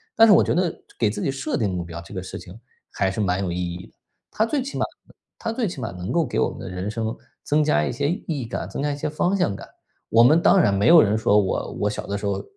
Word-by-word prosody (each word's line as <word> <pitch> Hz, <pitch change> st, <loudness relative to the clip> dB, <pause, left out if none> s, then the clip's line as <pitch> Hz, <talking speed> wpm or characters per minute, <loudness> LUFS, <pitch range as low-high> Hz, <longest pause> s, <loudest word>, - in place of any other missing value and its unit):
但 225 Hz, -, +7 dB
是 210 Hz, -, +8 dB
我 -, -, +6 dB
觉 -, -, 0 dB
得， 175 Hz, -1 st, +1 dB, 0.3 s
给 110 Hz, -3 st, +3 dB
自 105 Hz, -, -4 dB
己 140 Hz, -, 0 dB
设 135 Hz, +3 st, -3 dB
定 110 Hz, -5 st, 0 dB
目 90 Hz, -1 st, -2 dB
标 85 Hz, 0 st, -7 dB
这 85 Hz, -, -13 dB
个 95 Hz, -, -4 dB
事 95 Hz, -, -7 dB
情， 95 Hz, +6 st, -12 dB, 0.3 s
还 95 Hz, -, 0 dB
是 100 Hz, +3 st, -3 dB
蛮 90 Hz, -1 st, 0 dB
有 90 Hz, -, -2 dB
意 85 Hz, -, -3 dB, 0.2 s
义 90 Hz, +1 st, -9 dB
的， -, -, -26 dB, 0.4 s
它 220 Hz, -, +1 dB
最 275 Hz, +3 st, -1 dB
起 275 Hz, +2 st, -5 dB
码 -, -, +1 dB, 0.5 s
它 225 Hz, -, -3 dB
最 235 Hz, 0 st, -1 dB
起 170 Hz, -6 st, -6 dB
码， -, -, -3 dB
能 90 Hz, 0 st, -6 dB
够 170 Hz, -1 st, +2 dB
给 120 Hz, -, -4 dB
我 -, -, +2 dB
们 -, -, -10 dB
的 -, -, -7 dB
人 90 Hz, +3 st, -4 dB
生， 110 Hz, 0 st, -3 dB, 0.3 s
增 150 Hz, +1 st, +2 dB
加 75 Hz, -, +2 dB
一 -, -, -2 dB
些 140 Hz, +4 st, -1 dB
意 175 Hz, -, -3 dB
义 145 Hz, -7 st, -2 dB
感， 115 Hz, -, -4 dB
增 140 Hz, -, -4 dB
加 145 Hz, -, 0 dB
一 145 Hz, -, -4 dB
些 150 Hz, -, -2 dB
方 175 Hz, +5 st, 0 dB
向 180 Hz, -, 0 dB
感， -, -, -9 dB, 0.4 s
我 115 Hz, -, +5 dB
们 155 Hz, +8 st, +6 dB
当 190 Hz, -, +5 dB
然 100 Hz, -, +3 dB
没 100 Hz, +1 st, +2 dB
有 165 Hz, -1 st, +9 dB
人 105 Hz, +1 st, +2 dB
说， 105 Hz, -2 st, +3 dB
我 95 Hz, -, -2 dB
我 105 Hz, -, +1 dB
小 105 Hz, -, -5 dB
的 100 Hz, -, -3 dB
时 105 Hz, -, -6 dB
候 100 Hz, -1 st, -1 dB
115 Hz, 320 characters per minute, -23 LUFS, 100-155 Hz, 0.5 s, 有